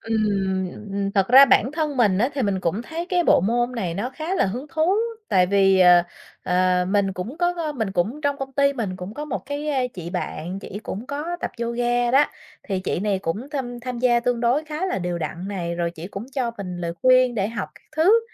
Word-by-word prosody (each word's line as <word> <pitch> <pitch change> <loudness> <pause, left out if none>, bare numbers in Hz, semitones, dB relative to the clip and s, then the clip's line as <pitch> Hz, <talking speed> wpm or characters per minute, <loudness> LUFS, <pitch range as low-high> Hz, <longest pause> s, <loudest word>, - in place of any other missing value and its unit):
Ừm, 195 -4 0 0.2
ừm. 200 0 -1
Thật 195 -2 +2
ra 265 +3 +10
bản 260 +1 +3
thân 305 -3 -2
mình 205 -6 +3
á, 240 - +3
thì 270 - -1
mình 195 -3 0
cũng 185 +7 -1
thấy 330 +7 -5
cái 355 -2 +2
bộ - - +5
môn 240 +3 +1
này 185 -8 -3
nó 220 +8 -3
khá 315 +7 -4
là - - +2
hứng 245 +9 -4
thú, 320 +4 +2 0.4
tại 180 -1 +4
vì, 195 -1 +4
ờ, 180 -1 +7 0.4
ờ, 180 0 +2
mình 195 -1 +1
cũng 215 - -6
có, 350 0 +2
ơ, 315 -3 -2
mình 220 -7 -3
cũng 210 +12 -1
trong 285 -2 0
công 270 -1 -6
ty 280 0 +3
mình 210 -8 -3
cũng 185 +3 -7
có 295 +1 -5
một 300 - -3
cái, 290 +2 -4
a, 270 -3 +1
chị 170 -2 -6
bạn 180 0 -4
chỉ 195 - -7
cũng 220 +4 -6
có 305 +5 -4
tập - - -3
yoga 240 +1 0
đó. 275 +3 +5 0.4
Thì 190 -3 -3
chị 180 - -2
này 200 -1 0
cũng 200 +9 -4
tham 245 -4 -4
tham 250 -1 -5
gia 240 -1 +3
tương 245 -1 0
đối 245 +6 +2
khá 310 +4 -3
là 370 - -1
đều 175 -1 -2
đặn 170 +4 -5
này, 170 -4 -3
rồi 170 0 -1
chỉ 170 0 -8
cũng 200 +3 -7
cho 255 -4 -1
mình 180 -3 -5
lời 170 -1 -3
khuyên 255 -1 +5
để 205 -2 0
học 225 -4 -4
các - - -19
thứ. 390 +9 +5
230 Hz, 240 wpm, -23 LUFS, 190-275 Hz, 0.4 s, ra